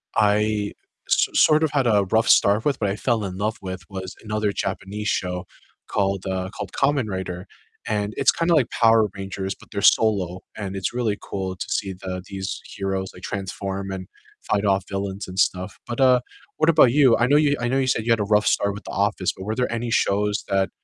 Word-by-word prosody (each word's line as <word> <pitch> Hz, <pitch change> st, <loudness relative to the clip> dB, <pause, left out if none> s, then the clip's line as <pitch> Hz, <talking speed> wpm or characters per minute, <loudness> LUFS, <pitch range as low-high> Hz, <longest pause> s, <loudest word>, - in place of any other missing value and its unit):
I 105 Hz, 0 st, +2 dB, 0.4 s
s -, -, +4 dB
sort 155 Hz, 0 st, +5 dB
of 155 Hz, -, +1 dB
had 135 Hz, -4 st, +1 dB
a 105 Hz, -3 st, +4 dB
rough 110 Hz, 0 st, +3 dB
start 105 Hz, +4 st, +4 dB
with 145 Hz, -, +1 dB
but 100 Hz, -2 st, 0 dB
I 100 Hz, -, -1 dB
fell 115 Hz, -4 st, 0 dB
in 95 Hz, -1 st, -5 dB
love 110 Hz, +2 st, -1 dB
with 95 Hz, -1 st, -6 dB
was 95 Hz, -1 st, -6 dB
another 105 Hz, -1 st, -1 dB
Japanese 100 Hz, +2 st, -4 dB
show 90 Hz, 0 st, -2 dB, 0.4 s
called, 100 Hz, -2 st, -1 dB
uh, 95 Hz, 0 st, -2 dB
called -, -, -6 dB
Kamen 140 Hz, -4 st, +1 dB
Rider, 95 Hz, 0 st, -5 dB, 0.4 s
and 105 Hz, -1 st, -1 dB
it's -, -, +4 dB
kinda 170 Hz, 0 st, +1 dB
like 135 Hz, -6 st, +2 dB
Power 115 Hz, -2 st, +4 dB
Rangers, 95 Hz, 0 st, -4 dB
but -, -, -19 dB
they're 100 Hz, -1 st, -3 dB
solo, 95 Hz, -4 st, +3 dB, 0.2 s
and 100 Hz, -2 st, -5 dB
it's 95 Hz, +4 st, -2 dB
really 115 Hz, -4 st, -1 dB
cool 95 Hz, -1 st, -4 dB
to -, -, -6 dB
see 95 Hz, -2 st, -1 dB
the 90 Hz, 0 st, -6 dB
these 95 Hz, -1 st, -5 dB
heroes, 95 Hz, -1 st, -3 dB
like, 90 Hz, -, -13 dB
transform 95 Hz, 0 st, -4 dB
and 95 Hz, -1 st, -6 dB, 0.4 s
fight 105 Hz, 0 st, 0 dB
off 95 Hz, -1 st, +2 dB
villains 100 Hz, 0 st, -4 dB
and 95 Hz, +1 st, -5 dB
stuff, 95 Hz, +1 st, 0 dB
but, 120 Hz, +2 st, -4 dB
uh, 125 Hz, -1 st, +5 dB, 0.4 s
what 155 Hz, +1 st, +3 dB
about 150 Hz, -7 st, +6 dB
you? 135 Hz, -4 st, +5 dB
I 120 Hz, -, +3 dB
know 145 Hz, +2 st, +5 dB
you 145 Hz, -1 st, +3 dB
I 120 Hz, -, -1 dB
know 135 Hz, +1 st, +1 dB
you 130 Hz, -, 0 dB
said 110 Hz, -3 st, 0 dB
you 115 Hz, -, +1 dB
had 115 Hz, -, 0 dB
a -, -, +2 dB
rough 105 Hz, -, +3 dB
start 100 Hz, 0 st, +2 dB
with 105 Hz, -, -9 dB
The -, -, -7 dB
Office, 100 Hz, -2 st, 0 dB
but 95 Hz, -, -7 dB
were 110 Hz, +1 st, -2 dB
there 125 Hz, -2 st, 0 dB
any 115 Hz, 0 st, -2 dB
shows 105 Hz, 0 st, +1 dB
that, 95 Hz, 0 st, +1 dB
100 Hz, 220 wpm, -23 LUFS, 95-115 Hz, 0.4 s, about